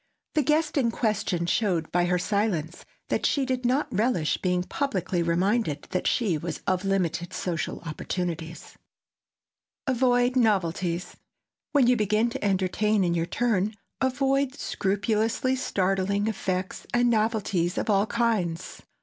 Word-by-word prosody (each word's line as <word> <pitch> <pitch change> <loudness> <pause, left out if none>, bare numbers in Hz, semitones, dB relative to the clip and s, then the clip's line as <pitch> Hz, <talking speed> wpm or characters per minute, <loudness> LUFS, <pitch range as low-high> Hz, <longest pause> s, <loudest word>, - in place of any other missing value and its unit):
The 310 - +3
guest 305 +2 +1
in 250 -4 +3
question 205 -7 0
showed 175 -4 0
by 175 0 +2
her 180 0 +2
silence 180 -4 -1 0.2
that - - 0
she 280 -2 +2
did 255 -1 -1
not 265 +4 +1
relish 205 -7 +1
being 180 -1 0
publicly 190 - -1
reminded 170 -1 +1
that 185 - 0
she 195 -10 +1
was 165 -1 -5
of 185 0 0
limited 175 -3 -1
social 170 -3 -3
opportunities. 165 0 -5 1.1
[Sidenote: - - +1
AVOID 245 0 +3
NOVELTIES] 180 -6 0 0.6
When 280 -4 +5
you 250 +1 +5
begin 215 +1 +1
to - - -5
entertain 200 +1 +1
in 175 -1 +1
your 170 0 0
turn 215 -3 0 0.3
avoid, 270 +1 +1
scrupulously, 220 +6 0
startling 195 -3 0
effects 190 -3 -3
and 240 0 +4
novelties 215 -6 0
of - - -1
all 205 0 +3
kinds. 210 -9 -1
200 Hz, 135 wpm, -26 LUFS, 175-240 Hz, 1.1 s, When